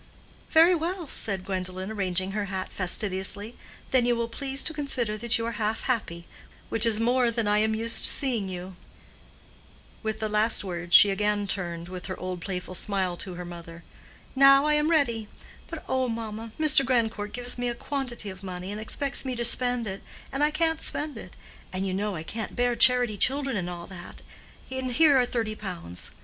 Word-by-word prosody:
"Very 330 +3 +6
well," 345 0 -2
said 195 -7 0
Gwendolen, 185 +1 -4
arranging 190 -2 -1
her 205 0 -2
hat 190 -1 -5
fastidiously, 195 +3 -1 0.4
"then 255 -2 +4
you 240 - +3
will 235 0 -2
please 270 +3 -3
to 320 - 0
consider 260 -7 -2
that 235 +2 +1
you 230 - -3
are 230 - -2
half 215 +1 -1
happy, 175 -9 -2 0.4
which 225 +1 +3
is 220 -2 +3
more 245 +1 +2
than 230 -2 -1
I 210 0 +3
am 220 0 +1
used 230 +1 +1
to - - +6
seeing 235 -8 0
you." 180 0 -7 1.3
With 220 -1 -3
the 220 - -1
last 215 +1 +2
words 175 -2 -1
she 205 - +8
again 205 +1 0
turned 170 -3 -4
with 180 0 -8
her 185 - -6
old 185 -1 -5
playful 185 0 -5
smile 190 -1 0
to 185 -1 -6
her 180 0 -7
mother. 170 -1 -10 0.5
"Now 275 +1 +7
I 300 - +3
am 300 +1 +2
ready; 235 -9 +1 0.4
but - - -7
oh, 260 -1 0
mamma, 225 -1 -5
Mr. 305 -3 +5
Grandcourt 230 -5 0
gives 245 0 0
me 245 0 -1
a 240 - -3
quantity 245 -6 -4
of 185 0 -12
money, 185 0 -6
and 210 +1 -5
expects 275 +5 +2
me 260 -2 -3
to 235 0 -2
spend 245 0 +4
it, 195 -1 -5 0.3
and 275 +2 -1
I 300 - +4
can't 320 +1 0
spend 295 -1 -1
it; 185 -5 -10 0.4
and 190 +1 -3
you 190 - -2
know 200 +1 -2
I 155 - -5
can't 220 +6 -6
bear 245 -1 +1
charity 245 -4 +4
children 270 +4 +3
and 180 -3 -2
all 175 -1 -7
that; 175 -2 -11 0.5
and 260 -1 -3
here 290 +1 +5
are 250 -1 +3
thirty 225 -3 -2
pounds. 180 - -6
220 Hz, 195 wpm, -26 LUFS, 190-250 Hz, 1.3 s, she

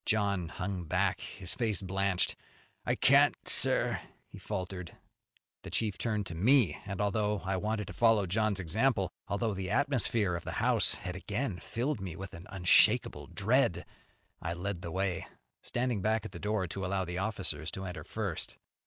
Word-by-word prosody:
John 100 -5 +1
hung 90 -1 -4
back, 80 - +1
his 90 -2 -5
face 110 -5 0
blanched. 95 -1 0 0.5
"I - - +2
can't, - - +5
sir," - - +2 0.2
he - - -12
faltered. 90 -3 -5 0.6
The - - -8
chief 105 -4 -1
turned 105 -3 -1
to 85 - -5
me, 115 +6 +5
and, 100 -1 -4
although 105 0 +1
I 95 0 0
wanted 105 +2 -1
to - - -8
follow 115 -4 +4
John's 105 +2 0
example, 95 +2 +1 0.2
although 100 +2 0
the 95 -1 -4
atmosphere 120 -6 +2
of 85 - -5
the - - -5
house - - +3
had 90 - -6
again 105 +1 -3
filled 125 0 -2
me 90 -4 -5
with 95 0 -8
an 85 +1 -10
unshakable 95 -2 +4
dread, - - +1 0.6
I 85 - -2
led 90 0 -4
the 85 - -5
way, 95 0 -1 0.3
standing 120 -4 -1
back 110 +1 +1
at - - -6
the 85 - -8
door 105 -1 0
to 95 +3 -5
allow 95 0 0
the 90 +1 -4
officers 95 -5 -2
to 95 - -6
enter 90 -1 -6
first. - - -3
100 Hz, 170 wpm, -31 LUFS, 90-110 Hz, 0.6 s, can't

